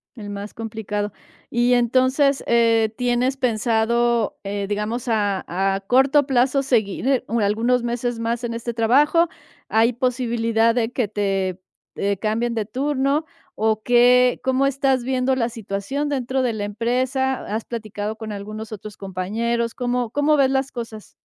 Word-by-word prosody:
El 210 -4 -8
más 205 +1 -6
complicado, 210 -2 -4 0.4
y 240 +1 +2
entonces, 260 +3 +2
eh, 230 -2 +3
tienes 250 +1 +1
pensado, 235 -1 +1
eh, 200 0 -3
digamos 210 +4 -2
a 205 -4 0
a 195 +2 0
corto 270 +3 +4
plazo 265 +1 +2
seguir 250 +1 +1 0.2
algunos 225 +4 +2
meses 240 0 -2
más 230 +1 -2
en 235 - -2
este 230 0 -4
trabajo, 290 +9 +4 0.4
¿hay 225 +2 +3
posibilidad 230 -2 +1
de 235 -1 0
que 245 -3 -1
te, 195 -3 -1 0.4
eh, 200 0 -1
cambien 225 +4 -1
de 220 -2 -2
turno 275 +5 0 0.3
o 220 0 +1
qué 245 +1 +4
cómo 260 +1 +2
estás 270 -2 +1
viendo 260 +1 +1
la 240 -2 0
situación 225 +6 -3
dentro 260 -1 -1
de 240 - 0
la 210 -2 -3
empresa?, 255 +5 -1
¿has 215 +2 -3
platicado 215 -2 -5
con 220 -1 -7
algunos 215 +2 -7
otros 215 0 -8
compañeros?, 225 +5 -2
¿cómo 245 -2 -2
cómo 290 +2 +2
ves 265 -1 +3
las 270 0 0
cosas? 225 -3 -8
235 Hz, 145 wpm, -22 LUFS, 215-255 Hz, 0.4 s, corto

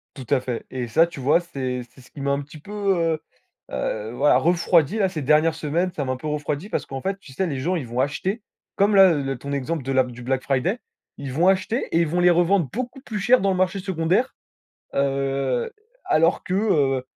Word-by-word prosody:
Tout 130 -3 -9
à - - +3
fait 125 -2 -5
et 125 -2 -4
ça, 165 +8 +4
tu 160 -5 -9
vois, 145 +6 +3
c'est 130 -7 -4
c'est 130 - -16
ce 125 - -19
qui 145 - -11
m'a 140 0 0
un 140 +1 -1
petit 145 +2 -12
peu, 200 - -14
heu 185 -6 +1 0.6
heu, 110 +1 -3
voilà, 135 +4 +3
refroidi 170 +2 +3
là 195 -3 +3
ces 160 -5 -5
dernières 155 +3 +3
semaines, 160 +4 -1
ça 150 - -3
m'a 130 - -1
un - - -3
peu 140 - -9
refroidi 150 +3 -3
parce - - -2
qu'en 135 0 -6
fait, 195 +6 -2
tu 155 -8 -15
sais, 185 +8 -1
les 140 -5 -3
gens 180 +6 0
ils 150 -7 -4
vont 120 +2 -3
acheter 185 - -1 0.3
comme 205 +1 +3
la 190 -2 +8
le 135 -3 -2
ton 140 +3 -6
exemple 140 +3 -2
de 135 - -4
la 130 -1 +3
du 125 -1 -10
black 130 +1 -1
friday, 140 - 0 0.4
ils 140 -2 -6
vont 165 +7 +3
acheter 195 +6 +1
et 165 - +3
ils 170 - +3
vont 175 +3 0
les 180 - +5
revendre 175 -1 +3
beaucoup 250 +4 -5
plus 215 -6 -5
cher 245 +5 +4
dans 195 - +2
le 185 - -1
marché 185 +1 +1
secondaire, 185 +5 0 0.6
heu, 135 -2 0 0.4
alors 165 +3 +3
que, 185 - -2
heu, 145 -11 +2
155 Hz, 235 wpm, -23 LUFS, 135-185 Hz, 0.6 s, la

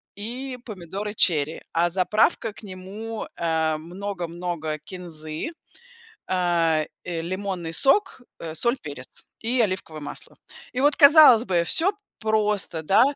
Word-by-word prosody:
и 250 +5 -5
помидоры 200 0 -6
черри, 160 -5 +2
а 170 +1 +2
заправка 205 +4 +1
к 210 - -14
нему- 205 +4 -7
э, 160 -2 0
много-много 175 -2 -4
кинзы, 160 - -6 0.8
э, 170 -4 +1 0.2
э, 170 -2 -3
лимонный 185 -2 -4
сок, 275 - +2 0.2
э, 160 -1 -6
соль, 235 +8 +2
перец 145 -3 -10 0.2
и 245 +2 +1
оливковое 185 -7 -1
масло. 145 - -8 0.4
И 250 - -2
вот, 290 +1 +3
казалось 285 -6 +9
бы, 175 -5 +1
всё 335 - +2 0.3
просто, 210 -6 0
да. 195 +8 +5
185 Hz, 125 wpm, -24 LUFS, 165-220 Hz, 0.8 s, казалось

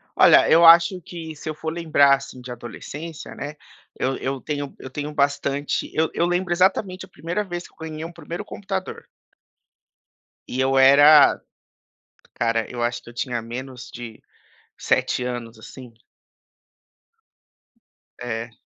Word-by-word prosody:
Olha, - - +6
eu 165 +1 +6
acho 170 +2 +7
que 160 -1 -8
se 150 - -11
eu 155 - -2
for 160 +1 -4
lembrar, 155 -4 +4
assim, 135 -2 -10
de 125 0 -9
adolescência, 145 +6 -8
né, 145 +1 -6 0.4
eu 130 +1 0
eu 135 0 -4
tenho 145 -2 -5
eu 130 - -9
tenho 150 +3 -5
bastante 140 0 -1
eu 160 0 +2
eu 170 - +1
lembro 175 0 -1
exatamente 185 +1 +1
a 185 - -24
primeira 170 +6 -3
vez 175 -3 -6
que - - -27
eu - - -33
ganhei 160 -1 -7
um 165 - -7
primeiro 170 +3 -7
computador. 195 -2 -6 1.4
E 130 - -4
eu 135 0 +2
era 145 +2 +7 0.9
cara, 115 -1 -1
eu 120 -1 -6
acho 120 0 -1
que - - -13
eu - - -13
tinha 120 -1 -3
menos 125 +2 -8
de 115 -2 -9 0.6
7 125 - 0
anos, 120 -2 -5
assim. 125 +1 -12 2.3
É. 115 -1 -5
145 Hz, 145 wpm, -23 LUFS, 125-170 Hz, 2.3 s, acho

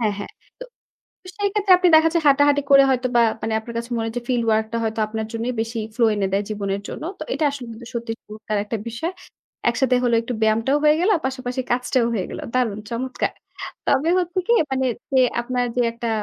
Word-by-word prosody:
হ্যাঁ, 215 -3 +1
হ্যাঁ, 205 - -6 0.3
তো - - -7 0.7
সেই 405 -1 +1
ক্ষেত্রে 410 -2 +1
আপনি 365 0 +3
দেখা 320 +1 +6
যায় 335 -2 +1
হাঁটাহাঁটি 285 +1 +4
করে 275 0 +8
হয়তো 255 -1 +1
বা, 240 - +6 0.2
মানে 220 - -2
আপনার 235 +1 -9
কাছে 235 +1 -4
মনে 225 - -1
হয় 225 - -6
যে - - -2
field 245 -2 +1
work 220 0 +2
-টা 230 - -1
হয়তো 220 0 -2
আপনার 220 0 -4
জন্যই 230 +2 -2
বেশি 225 +1 -4 0.2
ফ্লো 240 - +3
এনে 200 -2 0
দেয় 200 +1 +1
জীবনের 200 -2 -2
জন্য। - - -7 0.2
তো - - -3
এটা - - -2
আসলে 275 -3 -7
কিন্তু 230 +1 -10
সত্যি 235 -1 -3
চমৎকার 215 0 -5
একটা 215 +2 -3
বিষয়। 320 +11 -4 0.6
একসাথে 250 +2 +1
হলে 235 -1 +3
একটু 240 +2 -5
ব্যায়ামটাও 225 +6 +2
হয়ে 300 0 +5
গেল, 375 - +3 0.2
পাশাপাশি 260 -1 -3
কাজটাও 250 0 +1
হয়ে 195 -5 -1
গেল। - - -6
দারুণ 235 -5 0
চমৎকার 255 +2 -2 0.6
তবে 285 +4 +2
হচ্ছে 360 +1 -1
কি 470 - +4 0.2
মানে 265 0 0 0.3
যে 260 - +5 0.2
আপনার 245 +1 -1
যে 250 - +2
একটা 235 0 -4
245 Hz, 215 wpm, -22 LUFS, 225-275 Hz, 0.7 s, করে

